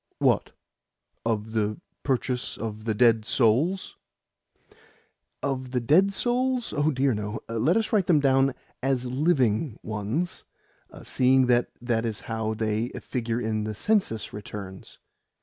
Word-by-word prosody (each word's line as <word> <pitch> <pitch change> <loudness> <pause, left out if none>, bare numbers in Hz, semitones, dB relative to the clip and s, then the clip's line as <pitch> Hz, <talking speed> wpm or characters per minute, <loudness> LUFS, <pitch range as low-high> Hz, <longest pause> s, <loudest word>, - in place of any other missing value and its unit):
"What? - - +2 0.7
Of 110 -1 -1
the 105 -1 -1 0.2
purchase 130 -2 -1
of 110 -1 -5
the 110 -2 0
dead 115 -1 +4
souls?" 135 - +1 1.5
"Of 130 -2 -2
the 125 - +2
'dead' 165 +11 +4
souls? 250 +3 0
Oh 145 +1 +2
dear 135 -2 +2
no! 105 +1 -3
Let 115 - +2
us 225 +1 -1
write 200 -5 +3
them 165 -4 +5
down 135 -1 +3 0.3
as 130 -1 0
LIVING 130 -3 +1
ones, 110 - -3 0.6
seeing 130 0 +3
that 120 0 +3
that 120 -2 0
is 110 -3 -3
how 110 -1 -3
they 110 +2 -1
figure 120 -2 -2
in 110 -2 -1
the 110 0 -4
census 190 - 0
returns. 100 -2 -8
120 Hz, 130 wpm, -26 LUFS, 110-140 Hz, 1.5 s, them